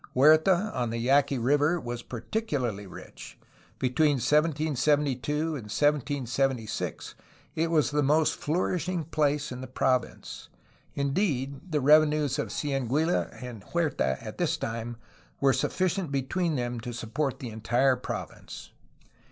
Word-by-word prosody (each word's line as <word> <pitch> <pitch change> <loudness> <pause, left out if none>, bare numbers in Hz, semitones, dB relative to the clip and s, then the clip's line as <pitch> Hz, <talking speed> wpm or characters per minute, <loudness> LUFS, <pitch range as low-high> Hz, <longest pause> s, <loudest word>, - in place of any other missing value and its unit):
Huerta 160 +9 +5
on 120 -2 -1
the 115 - -3
Yaqui 135 +3 +3
River 145 +7 +2
was 120 -4 -5
particularly 120 - -3
rich; - - -11 0.4
between 145 +4 +2
1772 150 -1 +1
and 165 +1 -1 0.2
1776 135 -3 -1 0.4
it 165 +1 0
was 155 -3 +2
the 150 0 +2
most 150 +2 +3
flourishing 175 +2 -1
place 150 -2 0
in 125 0 -6
the 130 - -6
province. 130 -1 -2 0.5
In 140 -1 -1
deed, 140 -3 -1
the 150 -2 +1
revenues 150 -1 +4
of - - -1
Cieneguilla 145 +3 0
and 120 -5 -8
Huerta 145 - 0
at - - -8
this - - +1
time 115 +1 -4 0.4
were 135 -1 +4
sufficient 180 +5 -1
between 150 +5 -1
them 120 -2 -2
to 120 +2 -6
support 120 +4 -2
the 125 - -6
entire 125 +4 +2
province. 125 - -7
140 Hz, 125 wpm, -28 LUFS, 125-155 Hz, 0.5 s, Huerta